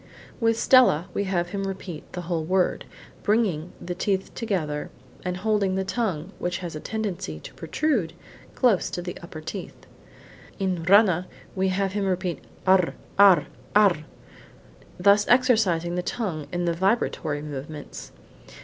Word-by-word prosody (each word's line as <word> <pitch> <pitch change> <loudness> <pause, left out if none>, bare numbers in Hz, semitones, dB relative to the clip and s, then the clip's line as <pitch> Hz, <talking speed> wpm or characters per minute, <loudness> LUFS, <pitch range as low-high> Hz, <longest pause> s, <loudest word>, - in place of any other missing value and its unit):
With 230 -1 +2
stella 190 - +5
we 200 - -1
have 175 -2 -1
him 195 +1 -3
repeat 185 -4 -7
the 180 - -4
whole 170 -2 -2
word, 185 +2 +1 0.4
bringing 195 -7 +1
the 175 - -4
teeth 190 +1 -1
together, 160 -10 -2 0.3
and 180 -1 -2
holding 200 -1 +1
the 190 - 0
tongue 190 -5 -2
(which 175 0 -1
has 175 -4 -6
a - - -4
tendency 190 - -4
to - - -11
protrude) 210 - -1 0.4
close 235 -8 +3
against 175 - -4
the 180 - -6
upper 170 -2 -9
teeth. 180 +4 -7 0.7
In 185 -4 -1
rana 185 -2 +5 0.3
we 190 0 +1
have 195 +1 0
him 200 -1 0
repeat 185 -2 -2 0.2
r, 185 -2 +4 0.2
r, 200 -3 +7 0.3
r, 205 -5 +6 1.0
thus 200 +3 +5
exercising 220 -9 +3
the 180 - 0
tongue 180 -7 -3
in 175 0 -1
the 170 - +1
vibratory 165 -6 0
movements. 150 0 -7
185 Hz, 145 wpm, -25 LUFS, 170-205 Hz, 1.0 s, r